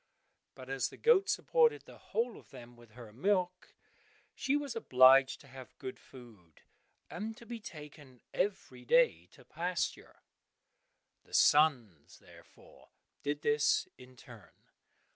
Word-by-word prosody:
But 130 -1 -12
as 135 -1 -2
the - - -14
goat 440 -4 +3
supported 470 -1 +2
the - - -15
whole 235 0 -3
of - - -21
them 120 0 -13
with 120 -2 -19
her 115 -3 -13
milk, 180 - -2 0.6
she 270 +2 -1
was 285 -5 -3
obliged 130 - +5
to 140 - -18
have 130 -2 -13
good 130 - -8
food, 110 - -17 0.4
and 220 +5 -6
to 235 - -14
be 235 0 -7
taken 150 - -12
every 200 0 -3
day - - +2
to - - -19
pasture. - - -4 1.0
The - - -8
sons, 125 - +2
therefore, - - -19 0.3
did 145 +1 -3
this, 145 0 +2
in 125 0 -16
turn. 115 - -17
145 Hz, 135 wpm, -32 LUFS, -, 1.0 s, obliged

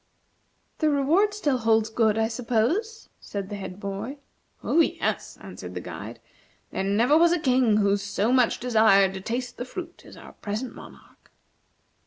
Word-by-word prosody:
"The 310 - +3
reward 305 +9 +3
still 290 -11 0
holds 220 -1 +2
good, 220 -2 +2
I 220 0 +2
suppose," 250 - -1
said 200 -1 -6
the 205 - -5
head 190 -1 -7
boy. 205 +7 -5 0.5
"Oh, 335 - +2
yes," 330 - 0
answered - - -9
the - - -3
guide; - - -8 0.5
"there - - -2
never 225 +9 +3
was 335 +1 +5
a 350 - +2
King 250 -6 +3
who 200 -1 +3
so 205 +3 -1
much 255 -3 +3
desired 220 -5 +4
to 190 - -6
taste 245 +4 -4
the - - -4
fruit 345 +5 -8
as - - -14
our - - -13
present 215 +5 -5
monarch." - - -15
230 Hz, 165 wpm, -25 LUFS, 205-285 Hz, 0.5 s, was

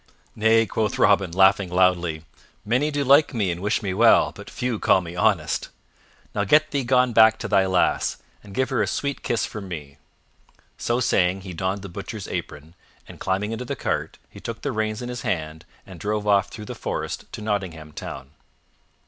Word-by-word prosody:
"Nay," 110 +1 +4
quoth 110 0 -1
Robin, 100 -2 +4
laughing 95 +1 +4
loudly, 85 -3 +1 0.4
"many 125 +8 +1
do 145 -1 -1
like 140 +1 +5
me 100 -6 +1
and 85 +1 -5
wish 105 +2 0
me 95 -2 -1
well, 115 +4 +5
but - - -11
few 120 -3 -3
call - - +4
me 85 -1 -8
honest. 90 - +1 0.6
Now 100 - 0
get 150 +9 +4
thee 140 -2 0
gone 125 0 +3
back 110 0 +6
to - - -5
thy 95 0 +3
lass, 95 -1 +1 0.2
and 100 -2 -12
give 130 0 0
her - - +1
a - - +1
sweet 140 -1 -2
kiss 120 - 0
from 105 -3 -7
me." 75 -6 -8 0.8
So 120 +1 -1
saying, 95 -4 +2
he 95 -1 -8
donned 95 +3 -2
the - - -6
Butcher's 85 - -7
apron, 75 +3 -6 0.3
and, - - -12
climbing 95 +3 -1
into 115 +2 -4
the - - -3
cart, - - -3
he - - -13
took 115 -1 -7
the 140 - -1
reins 110 0 -2
in 120 - -5
his 125 -1 -5
hand 80 -2 -3 0.2
and 95 -3 -11
drove 105 +3 -2
off 100 -2 +3
through 105 - -9
the - - -6
forest - - -5
to - - -6
Nottingham 90 -7 -3
Town. 70 -2 -8
100 Hz, 195 wpm, -23 LUFS, 90-115 Hz, 0.8 s, back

